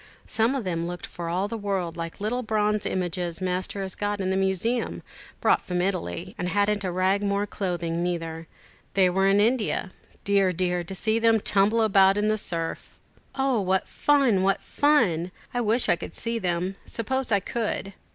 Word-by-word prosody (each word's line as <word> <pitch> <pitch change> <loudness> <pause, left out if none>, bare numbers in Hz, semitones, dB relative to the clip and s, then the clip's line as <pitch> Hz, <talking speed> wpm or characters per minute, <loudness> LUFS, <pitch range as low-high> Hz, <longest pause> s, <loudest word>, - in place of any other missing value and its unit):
Some 230 +4 +1
of 265 - -2
them 170 -3 -2
looked 175 0 -5
for 170 -1 -6
all 185 +4 0
the 225 +1 -5
world 190 -5 -2
like 165 -1 -5
the - - -8
little 245 +4 0
bronze 210 -2 0
images 175 -1 -2
Master 185 +2 -2
has 190 -1 -4
got 205 0 -2
in 190 -1 -1
the - - +1
museum, 195 +5 0 0.4
brought - - +4
from 180 -1 -3
Italy, 175 - -2
and 180 - -1
hadn't 205 +1 +1
a 185 - -1
rag 185 +3 +1
more 200 0 0
clothing 175 -4 -2
neither. 165 -2 -3 0.5
They 185 -2 +4
were 195 +2 +2
in 195 +1 +4
India. 215 -3 +1 0.3
Dear, 195 -2 +3
dear, 180 0 0
to 190 +2 -6
see 220 +3 +1
them 225 -1 +4
tumble 205 +3 +3
about 195 -2 +5
in 210 +1 +2
the 215 0 +1
surf!" 165 -4 -4 0.4
"O, 265 -4 +1
what 190 0 +1
fun! 275 -9 +3
what 195 +1 +1
fun! 210 - +2 0.2
I 245 - 0
wish 230 +2 +1
I - - +3
could - - -8
see 230 0 -2
them. 180 0 -1
Suppose 260 +2 -2
I 200 - +4
could." 205 -1 -3
195 Hz, 190 wpm, -26 LUFS, 180-215 Hz, 0.5 s, about